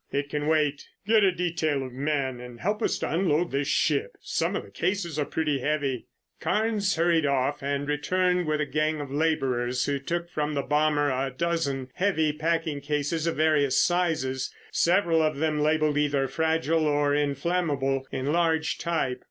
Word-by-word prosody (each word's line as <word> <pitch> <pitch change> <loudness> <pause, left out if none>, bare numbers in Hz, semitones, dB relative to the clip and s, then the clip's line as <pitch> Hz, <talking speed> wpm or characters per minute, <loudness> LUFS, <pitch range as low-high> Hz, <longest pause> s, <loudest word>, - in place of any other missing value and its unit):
"It 140 0 -2
can 150 0 -2
wait. 150 -2 +1 0.2
Get 215 0 +4
a 190 - +5
detail 165 -6 -1
of 130 - -9
men 135 -2 -1
and 125 -1 -10
help 210 +4 -1
us - - +1
to - - -3
unload 170 -1 +1
this 140 +1 -1
ship. 150 -6 +1
Some - - -1
of - - -2
the 100 - -15
cases 170 - -2
are 145 - +1
pretty 150 -3 -1
heavy." 140 -3 -1 0.3
Carnes 210 -2 0
hurried 165 -2 +2
off 140 +1 0
and 140 +1 -2
returned 180 +4 +1
with 155 0 0
a - - +1
gang 155 +1 0
of 145 -2 -6
laborers, 130 -5 0
who 140 -1 -1
took 170 +5 -3
from 150 -2 -2
the 140 - 0
bomber 150 -1 +2
a 130 +1 -1
dozen 140 -3 -2
heavy 160 -6 +1
packing 160 -1 -1
cases 150 +3 -1
of 165 - 0
various 150 -3 +3
sizes, 160 -7 0 0.2
several 170 -2 +3
of 155 -2 0
them 155 0 0
labelled 155 -1 +2
either 140 -2 +1
"Fragile" 160 +2 +1
or 145 -1 +2
"Inflammable" 145 -2 0
in 135 +2 -2
large 160 -2 +1
type. 140 -7 -1
150 Hz, 175 wpm, -26 LUFS, 140-165 Hz, 0.3 s, a